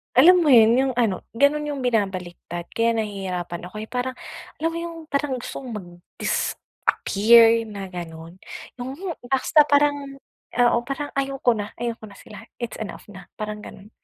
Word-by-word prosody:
Alam 345 +5 +7
mo - - +4
yun, 225 -1 +8
yung 265 -1 +2
ano 225 -7 0
ganon 285 +5 +3
yung 290 -3 -4
binabaliktad 185 -7 -2
kaya 230 0 +1
nahihirapan 190 -5 -4
ako 215 +4 -7
eh, 220 - -8
parang 250 +1 -2 0.5
alam 330 - +2
mo 330 - -5
yung 335 0 -5
parang 280 -3 -1
gusto - - -6
kong 250 -4 -7
mag-disappear 215 +4 +2
na 200 -3 -7
ganon. 170 -1 -8 0.4
Yung 255 +2 -5 0.3
basta 270 +4 +4
parang 285 -1 +1 0.3
oo 240 -1 +4
parang 285 +2 -4
ayaw 275 0 -2
ko 235 -3 +3
na 205 0 -5
ayaw 235 -1 -2
ko 220 - -11
na 205 - -13
sila, 210 +2 -12 0.2
it's 235 - -4
enough 215 -1 -8
na 195 -2 -11
parang, 210 0 -5
ganon. 200 +2 -12
230 Hz, 165 wpm, -23 LUFS, 200-270 Hz, 0.5 s, yun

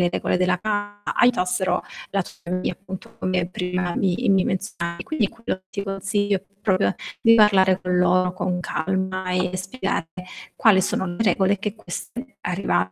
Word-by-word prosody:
le 175 - +4
regole 180 - 0
della 180 0 +2
casa, 205 -1 -2
aiutassero 185 -6 +2 0.3
la 195 -1 +1
tua - - -12
famiglia 180 +1 -1
appunto 190 +1 -10
come 180 -2 0
prima 180 -1 -2
mi 185 -3 +2 0.2
mi 190 -1 +4
menzionavi. 175 -3 -3
Quindi 225 -4 0
quello 230 -4 -4
che 185 - -47
ti 200 - -3
consiglio 200 +1 0
è 190 - -8 0.2
proprio 190 -2 +2 0.3
di 230 0 +6
parlare 190 -3 +5
con 180 -1 0
loro 180 0 +3
con 180 -1 -2
calma 185 +2 -2
e 185 0 0
spiegare 185 -3 -3 0.5
quali 210 -4 +5
sono 190 - 0
le 175 +5 -2
regole 200 -2 +3
che 205 +1 -3
queste 240 +5 -8
arriva 180 +2 0
190 Hz, 165 wpm, -23 LUFS, 180-205 Hz, 0.5 s, di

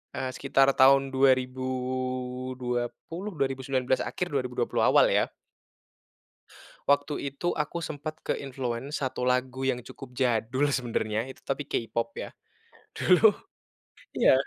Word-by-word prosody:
eee, 130 0 -2
sekitar 135 0 +3
tahun 135 +1 +6
2020, 130 +4 -1
2019 130 -1 0
akhir, 180 - -3
2020 125 -2 0
awal, - - +6
ya. - - +2 1.6
Waktu 145 +1 +2 0.2
itu 175 +4 -1
aku 165 +3 -3
sempat 155 0 -5
ke-influence, 135 +1 -3
satu 125 -1 -1
lagu 130 +1 0
yang 125 -2 -1
cukup 130 0 -11
jadul 130 +3 +1
sebenarnya, 115 -3 -1
itu 130 - -12
tapi 140 +1 -3
K-pop, 115 0 -2
ya. - - -6 0.7
Dulu 185 +4 +6 0.9
iya. - - +6
130 Hz, 110 wpm, -28 LUFS, 125-140 Hz, 1.6 s, tahun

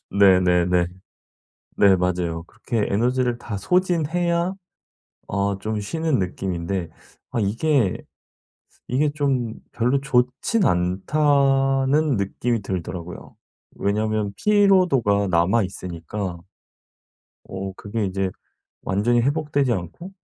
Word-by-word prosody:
네네네. 90 -2 +4 0.9
네 100 -2 +5
맞아요. 90 -2 -1
그렇게 110 +4 -3
에너지를 125 +3 +1
다 115 -4 -6
소진해야 175 - +1 0.8
아 100 0 0
좀 110 0 -2
쉬는 160 +5 -1
느낌인데 90 -1 -3 0.4
아 120 - -1
이게 115 +1 +1 0.9
이게 145 +4 +2
좀 135 -6 0 0.2
'별로 125 +4 +1
좋지는 130 - +1
않다.'는 135 - +2
느낌이 115 +3 -1
들더라고요. 90 -2 -6 0.4
왜냐하면 105 0 -1
피로도가 180 - +3
남아 90 +6 +3
있으니까 90 0 -5 1.0
어 95 0 -6
그게 105 +1 -3
이제 95 0 -2 0.5
완전히 120 +5 +2
회복되지 145 -2 +1
않고 105 - -6
110 Hz, 230 characters per minute, -23 LUFS, 95-140 Hz, 1.0 s, 네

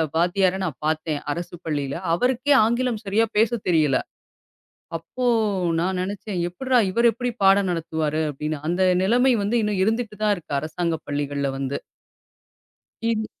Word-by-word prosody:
வாத்தியார 180 +2 +2
நான் 160 -7 -5
பாத்தேன். 155 -1 -1
அரசுப் 175 +2 -6
பள்ளியில 145 -3 -2 0.2
அவருக்கே 255 +8 +2
ஆங்கிலம் 235 0 0
சரியா 210 +3 +2
பேசத் 225 0 +2
தெரியல. 155 -6 +3 1.0
அப்போ 250 +10 -5 0.6
நான் 185 +1 -1
நினைச்சேன், 195 0 -4
"எப்புட்றா? 255 +8 +1
இவர் 235 +4 +4
எப்படி 245 +2 -3
பாடம் 195 0 +5
நடத்துவாரு?" 160 -2 -1
அப்டின்னு. 150 +2 -4
அந்த 175 +2 0 0.2
நிலைமை 245 +6 +4
வந்து 215 +4 +1
இன்னும் 205 -3 0
இருந்துட்டு 220 0 -1
தான் 210 -1 +4
இருக்கு. 160 -4 -9
அரசாங்க 165 +2 -2
பள்ளிகள்ல 145 -1 -1
வந்து. 135 0 -3 1.3
இது 220 -1 -1
185 Hz, 135 wpm, -23 LUFS, 155-225 Hz, 1.3 s, பாடம்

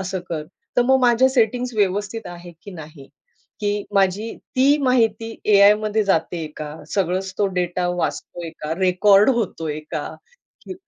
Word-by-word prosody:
असं 190 -1 -4
कर. 155 -2 -3 0.3
तर 245 - +5
मग 265 +2 +3
माझ्या 245 +1 +4
सेटिंग्ज 245 -1 0
व्यवस्थित 205 +2 -1
आहेत, 175 0 -10
की 200 - -10
नाही? 155 -5 -11 0.5
की 205 0 -1
माझी 195 +3 +1 0.2
ती 275 +3 +5
माहिती 230 -3 +1
एआयमध्ये 210 +1 +4
जातेय 165 -3 -1
का? 150 0 -6 0.2
सगळंच 190 0 -1
तो 205 - +2
डेटा 180 0 -1
वाचतोय 175 -1 -4
का? 150 +1 -3
रेकॉर्ड 195 +4 +4
होतोय 165 - -2
का? - - -2 0.6
की 375 - -7
200 Hz, 145 wpm, -21 LUFS, 175-225 Hz, 0.6 s, तर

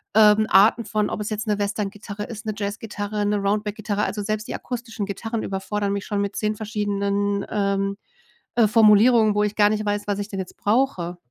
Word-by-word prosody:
ähm, 215 0 +6
Arten 215 +4 +5
von 210 0 0
ob - - -4
es 210 - -3
jetzt 215 +1 -3
'ne 210 -1 0
Western-Gitarre 205 0 -3
ist, 220 +1 -8
'ne 215 - -2
Jazz-Gitarre, 205 0 -3
'ne 205 +1 +1
Roundback-Gitarre. 210 +1 -1
Also 210 - -3
selbst 215 +1 -3
die - - -4
akustischen 235 -4 -5
Gitarren 225 +3 -4
überfordern 200 +1 -2
mich 200 0 -3
schon 205 -1 -1
mit 200 0 -3
10 215 0 0
verschiedenen, 205 -2 -1
ähm, 200 -1 0 0.6
äh, 230 -3 +5
Formulierungen, 215 0 +5
wo 210 - +2
ich 210 0 -1
gar 205 -1 +5
nicht 215 0 -1
weiß, 205 0 -1
was 205 -1 -1
ich 205 0 -4
denn 195 - -5
jetzt 185 - -6
brauche. 205 -7 0
210 Hz, 195 wpm, -23 LUFS, 200-215 Hz, 0.6 s, ähm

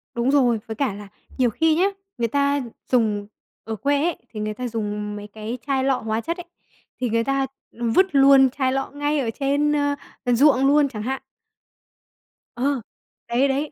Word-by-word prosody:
Đúng 240 +3 +1
rồi. 245 -6 +3
Với 220 - -5
cả 265 -8 0
là 205 0 -9 0.3
nhiều 250 -2 +3
khi 320 +7 +2
nhá, 365 +4 +3 0.3
người 235 -1 +1
ta 280 +2 +1 0.3
dùng 210 -4 +2 0.4
ở 225 0 -4
quê 285 +5 +1
ấy, 345 -1 0
thì 215 - -8
người 215 0 -2
ta 250 +3 -4
dùng 210 -2 -3
mấy 205 0 -7
cái 215 +3 -6
chai 270 -2 +1
lọ 265 -1 +2
hóa 220 +1 -2
chất 335 +5 -3
ấy, 355 - -8 0.6
thì 250 - +1
người 230 +1 +1
ta, 275 +1 0 0.2
ừm, 235 -1 -2
vứt 375 +11 +5
luôn 270 -1 +7
chai 260 0 0
lọ 270 +1 -2
ngay 290 +1 0
ở 240 - -1
trên, 285 +2 +2
ơ, 285 -1 +1 0.3
ờ, 245 - +2
ruộng 270 +1 +5
luôn 290 0 +5
chẳng 215 -5 -6
hạn. 265 +2 -2 1.3
Ờ, 265 +1 0 0.5
đấy, 250 +4 +2
đấy. 280 +3 -1
260 Hz, 195 wpm, -23 LUFS, 225-280 Hz, 1.3 s, luôn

